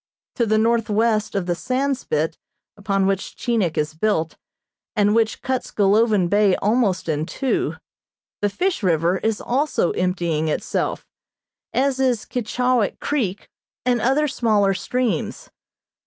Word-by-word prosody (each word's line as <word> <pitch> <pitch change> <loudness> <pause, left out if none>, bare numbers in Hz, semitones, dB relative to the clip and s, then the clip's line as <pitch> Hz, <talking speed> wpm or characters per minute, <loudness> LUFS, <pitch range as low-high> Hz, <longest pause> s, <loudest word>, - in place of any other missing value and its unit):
To 235 -3 +2
the 215 +1 +3
northwest 220 -1 +1
of 195 -3 0
the 175 - 0
sand 265 +9 -1
spit 160 - -2 0.4
upon 195 -1 0
which 195 0 -1
Chinik 215 -9 0
is 150 +1 0
built, 165 -2 0 0.6
and 205 -1 +3
which 225 -1 +1
cuts 260 -1 -2
Golovin 205 -1 +3
Bay 205 0 +3
almost 210 -4 +1
in 155 0 -1
two, 270 -2 -1 0.7
the 205 - +2
Fish 360 - -1
River 175 0 +2
is 220 -1 -1
also 270 - 0
emptying 175 -4 -1
itself, 155 - -2 0.7
as 265 0 +1
is 250 -5 +1
Keechawik 250 -1 0
Creek 215 -10 -2 0.4
and 245 -2 +2
other 275 +6 +2
smaller 215 -7 +2
streams. 235 -3 -2
215 Hz, 130 wpm, -22 LUFS, 185-245 Hz, 0.7 s, the